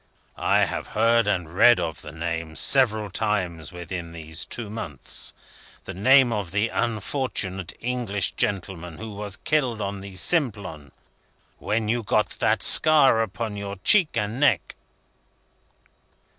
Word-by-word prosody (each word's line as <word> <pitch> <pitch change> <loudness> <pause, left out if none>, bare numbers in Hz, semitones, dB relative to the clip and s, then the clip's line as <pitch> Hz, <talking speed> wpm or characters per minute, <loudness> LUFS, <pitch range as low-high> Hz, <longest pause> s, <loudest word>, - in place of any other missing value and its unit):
I - - +2
have - - -5
heard 115 0 +4
and 90 -5 -1
read 120 +4 +6
of 80 -3 -4
the 75 - -9
name, 80 0 -4
several 110 - +2
times 90 -6 -2
within 90 -1 -7
these 80 -1 -6
two 120 -3 -5
months. 90 - -5 0.5
The - - -7
name 130 +5 +5
of 105 -5 -3
the 100 +5 0
unfortunate 105 - -2
English 120 -5 -2
gentleman 90 -4 -3
who 110 0 -7
was 100 -1 -6
killed 130 -7 0
on 100 -1 -4
the 95 -1 -10
Simplon. 100 - -1 0.7
When 110 0 -1
you 120 +2 0
got 105 0 +1
that - - +2
scar 145 -7 +6
upon 110 0 -4
your 100 0 -5
cheek 180 - +4
and 105 +3 -2
neck." 145 - +2
105 Hz, 135 wpm, -24 LUFS, 90-115 Hz, 0.7 s, read